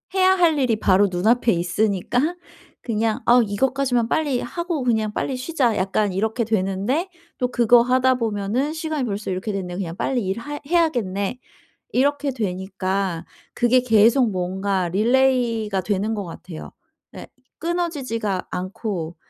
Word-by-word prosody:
해야 375 0 +5
할 330 -5 +3
일이 250 -4 +2
바로 200 0 +4
눈앞에 225 +7 +2
있으니까 210 - 0 0.5
그냥 225 +1 -1
'아 245 +1 +6
이것까지만 245 +2 0
빨리 285 -5 +1
하고 340 0 -3
그냥 220 -3 0
빨리 265 - -2
쉬자.' 255 -4 0
약간 195 +1 0
이렇게 220 +5 0
되는데 215 - -1 0.3
또 250 - +1
그거 240 -1 +5
하다 255 +1 +3
보면은 230 +4 -1
'시간이 315 -3 -3
벌써 205 -3 -3
이렇게 185 +4 -3
됐네? 185 -3 -4
그냥 175 -3 -4
빨리 250 -6 -1
일 190 +4 -2
하 290 +4 -6
해야겠네?' 250 - 0 0.5
이렇게 285 +2 +1
되니까 190 -4 -3 0.3
그게 245 +1 +3
계속 230 +1 +4
뭔가 185 0 -1
릴레이가 230 -1 +2
되는 205 +2 -1
것 205 - -3
같아요. 170 -1 -9 0.4
네 - - -10 0.3
끊어지지가 275 - -2
않고 180 -2 -4
225 Hz, 305 characters per minute, -22 LUFS, 195-260 Hz, 0.5 s, 아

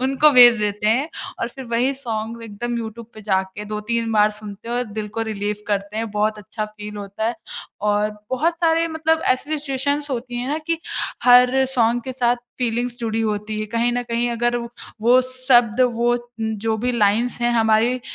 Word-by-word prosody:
उनको 275 +3 +5
भेज 245 -2 +9
देते 210 0 -1
हैं 260 +8 +2 0.3
और 230 - -1
फिर 265 +2 -9
वही 245 +3 +2
सॉन्ग 230 -3 -5
एकदम 235 +2 -4
यूट्यूब 225 0 -7
पे 215 - -10
जाके 190 0 -1
2-3 225 +2 -2
बार 210 0 +4
सुनते 210 +1 -9
हैं 240 - -2
और 245 - 0
दिल 215 0 -4
को - - +1
रिलीफ़ 205 0 -3
करते 205 +1 -2
हैं। 225 0 -2
बहुत 210 +1 0
अच्छा 215 +1 -5
फ़ील 210 0 -9
होता 200 +1 -5
है 235 - -1 0.6
और 210 +1 +1 0.2
बहुत 315 +7 +1
सारे 330 0 +3
मतलब 320 0 +1
ऐसी 290 +4 0
सिचुएशंस 285 +1 -1
होती 245 -1 -4
है 245 +2 -3
ना, 300 +2 -1
कि 330 +1 -2 0.5
हर 250 +2 +6
सॉन्ग 235 0 +2
के 260 +2 -5
साथ 245 -1 +1 0.2
फ़ीलिंग्स 240 0 -1
जुड़ी 225 -1 -1
होती 215 -1 -2
है 215 - -3
कहीं 235 +2 0
न 245 0 -1
कहीं 235 0 -1
अगर 240 +1 0
व 235 0 -6 0.3
वो 245 +3 +5
शब्द 255 -2 +3
वो 240 +1 +2 0.2
जो 220 0 -1
भी 245 +3 -1
लाइन्स 230 +2 +1
हैं 240 0 +2
हमारी 225 +1 +3
अ, - - -9
235 Hz, 195 wpm, -21 LUFS, 215-250 Hz, 0.6 s, भेज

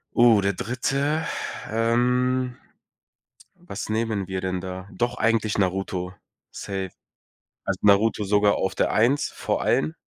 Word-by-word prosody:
Oh, 115 -4 +6
der 100 0 +1
Dritte. 140 - -1 0.4
Ähm, 125 +2 +1 1.0
was - - -7
nehmen 110 -3 -1
wir 95 -1 -3
denn 95 -1 -2
da? 95 +1 -7
Doch 120 +1 -2
eigentlich 110 -2 +1
„Naruto”, 95 -1 -1 0.4
safe. 95 -2 -5 0.7
Also 95 -1 -1
„Naruto” 105 +1 +4
sogar 105 +1 +3
auf 95 - -1
der - - +1
1, 125 +7 +2
vor - - -2
allen. 75 +1 +1
105 Hz, 125 wpm, -24 LUFS, 95-120 Hz, 1.0 s, Oh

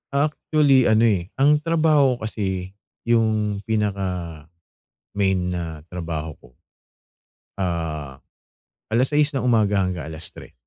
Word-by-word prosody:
Actually 140 -2 +3
ano, 110 +1 +5
eh, 95 -4 0
ang 150 +2 +4
trabaho 155 -6 +3
ko 110 - -3
kasi 95 -3 -4 0.3
yung 110 -3 +1
pinaka-main 90 -6 -3 0.9
na 80 -4 -5
trabaho 80 -3 -4
ko, 60 - -18 1.1
ah, 80 -7 -3 0.7
alas 125 +3 +3
6 150 0 +2
ng 135 - -1
umaga 105 -5 +2
hanggang 90 -4 -3
alas 80 0 -5
3. - - -13
100 Hz, 110 wpm, -22 LUFS, 85-130 Hz, 1.1 s, ano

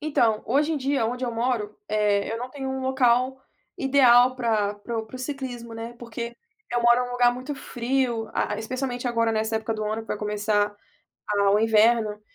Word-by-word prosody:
Então, 240 -8 +1
hoje 290 +7 +2
em - - 0
dia 275 -2 0
onde 250 +2 -3
eu 240 - -2
moro, 230 -3 -1
eh, 210 -1 +1
eu 225 - -3
não 250 +2 -6
tenho 270 -1 -5
um 265 0 -3
local 260 0 +2 0.4
ideal 255 -2 +5
para 220 -4 0
para 225 +3 -5
o 220 - -4
para 255 - -9
o - - -10
ciclismo, 255 -4 -6
né, 230 +1 -7
porque 235 0 -6 0.3
eu 240 0 0
moro 240 +1 +5
em - - -6
um - - -6
lugar 245 0 +4
muito 260 +4 -5
frio, 245 -3 -1 0.3
especialmente 250 +2 -3
agora 230 -1 +1
nessa 220 0 0
época 220 0 -2
do 215 0 -3
ano 215 +1 -3
para 220 - -3
começar 210 0 0 0.5
a 200 -1 +2
o 205 - +4
inverno, 220 -1 +3
235 Hz, 195 wpm, -25 LUFS, 220-255 Hz, 0.5 s, ideal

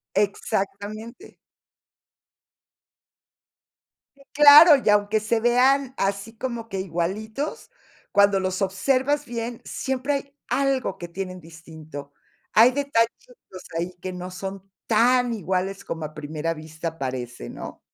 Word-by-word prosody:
Exactamente. 205 +3 -3 2.8
Sí, 275 - -19
claro, 295 +2 +9
y - - +2
aunque 210 +1 +2
se 225 +1 0
vean 260 +3 +3
así, 200 +3 -2
como 235 -2 -5
que 195 -3 -4
igualitos, 200 - -4 0.4
cuando 200 -1 +4
los 185 +1 -2
observas 265 +9 +1
bien, 235 0 -5
siempre 265 +2 -2
hay 280 0 -5
algo 270 -7 0
que 175 - -7
tienen 185 +1 -6
distinto. 160 -3 -11 0.4
Hay 230 +4 +6
detallitos 280 - -2
ahí, 175 +2 -3
que 185 - -5
no 180 0 -7
son 195 +1 -7 0.2
tan 245 +2 +3
iguales 190 -1 -2
como 160 -1 -5
a 155 0 -7
primera 155 +2 -3
vista 160 +1 -7
parece, 125 - -5
¿no? - - -9
205 Hz, 115 wpm, -24 LUFS, 180-250 Hz, 2.8 s, claro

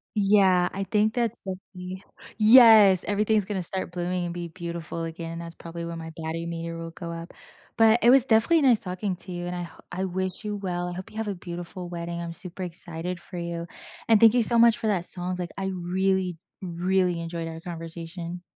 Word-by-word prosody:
Yeah. 195 -3 +3
I 195 +1 -3
think 210 +3 +1
that's 235 -3 +1
definitely 185 0 -8 0.3
Yes, 215 -4 +7
everything's 210 0 +1
gonna 195 -3 -3
start 180 0 -1
blooming 180 0 -3
and 170 - -5
be 175 -1 -6
beautiful 170 -1 -6
again, 165 0 -6
that's 170 0 -8
probably 170 0 -8
when 170 0 -6
my 160 0 -8
baddie 165 +1 -5
meter 165 0 -5
will 165 0 -7
go 170 0 -8
up. 165 +1 -8 0.4
But 225 +1 +5
it 240 - +6
was 260 -1 +9
definitely 255 +8 +3
nice 250 -5 +4
talking 185 +1 -2
to 185 +1 0
you, 175 0 -5
and 180 - -4
I 175 - -4
ho 170 - -12
I 190 - -3
wish 185 +2 -3
you 210 -1 -4
well. 180 -2 -3
I - - -6
hope 185 +1 -8
you 215 - -12
have 220 -1 -3
a 195 - -3
beautiful 175 0 -8
wedding. 170 0 -5
I'm 170 -1 -6
super 180 +1 -7
excited 175 0 -4
for 180 +1 -9
you. 170 0 -5 0.4
And 220 - +6
thank 225 +1 +7
you 245 -2 +3
so 235 +1 +5
much 235 -2 +5
for 220 - -3
that 185 -4 0
songs, 180 0 +3
like, 175 - -4
I 195 0 -3
really, 185 0 -1 0.2
really 180 0 0
enjoyed 165 0 -5
our 165 0 -8
conversation. 170 +1 -7
180 Hz, 210 wpm, -25 LUFS, 170-200 Hz, 0.4 s, was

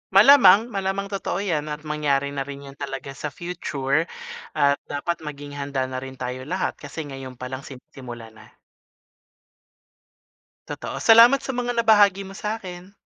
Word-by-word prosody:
Malamang 230 -1 +7
malamang 195 0 -2
totoo 195 0 -2
'yan 155 -6 -1
at 150 0 -6
mangyari 145 -2 0
na 135 -1 -4
rin 140 0 -8
yun 140 0 -12
talaga 135 -1 -5
sa 135 +2 -5
future 155 -2 -2 0.5
at 140 0 +3
dapat 160 +4 -3
maging 145 -2 -8
handa 140 -2 -3
na 130 0 -4
rin 130 0 -9
tayo 130 +1 -5
lahat 185 +4 -2
kasi 145 +2 -7
ngayon 135 -2 -8
pa 125 +1 -7
lang 130 - -4
sinisimulan 125 -4 -11
na. 110 - -16 2.2
Totoo. - - -6
Salamat 235 +4 +7
sa 265 -1 -5
mga 245 0 -1
nabahagi 205 -4 +4
mo 195 - -10
sa 215 +3 -3
akin. 180 -1 -10
150 Hz, 155 wpm, -23 LUFS, 135-195 Hz, 2.2 s, Malamang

